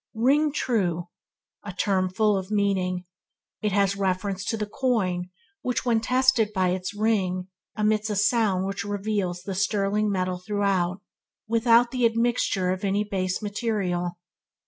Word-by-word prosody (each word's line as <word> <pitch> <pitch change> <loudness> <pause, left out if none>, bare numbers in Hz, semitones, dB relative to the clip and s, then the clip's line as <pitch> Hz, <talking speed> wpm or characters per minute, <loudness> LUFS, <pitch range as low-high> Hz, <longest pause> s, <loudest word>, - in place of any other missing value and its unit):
Ring 285 +7 +3
true, 180 - -1 0.5
a 205 - -6
term 185 0 0
full 210 +2 +2
of 190 0 -3
meaning. 190 -3 0 0.6
It 210 - 0
has 200 0 +2
reference 195 0 -1
to 225 - -1
the 210 - -2
coin 205 -7 -1 0.3
which, 250 0 -2
when 235 -2 +3
tested 255 -3 +3
by 185 -1 +2
its 185 +2 -3
ring, 190 -4 0 0.3
emits 215 0 +1
a 210 - -1
sound 200 -2 +2
which 195 -1 -3
reveals 200 -3 -2
the 195 - -4
sterling 200 +2 +1
metal 185 -1 -1
throughout, 195 -1 0 0.5
without 230 +1 +4
the 250 -2 +3
admixture 230 -5 +1
of 185 +2 -3
any 200 +1 +1
base 190 -1 -2
material. 195 -5 -2
200 Hz, 145 wpm, -25 LUFS, 185-220 Hz, 0.6 s, without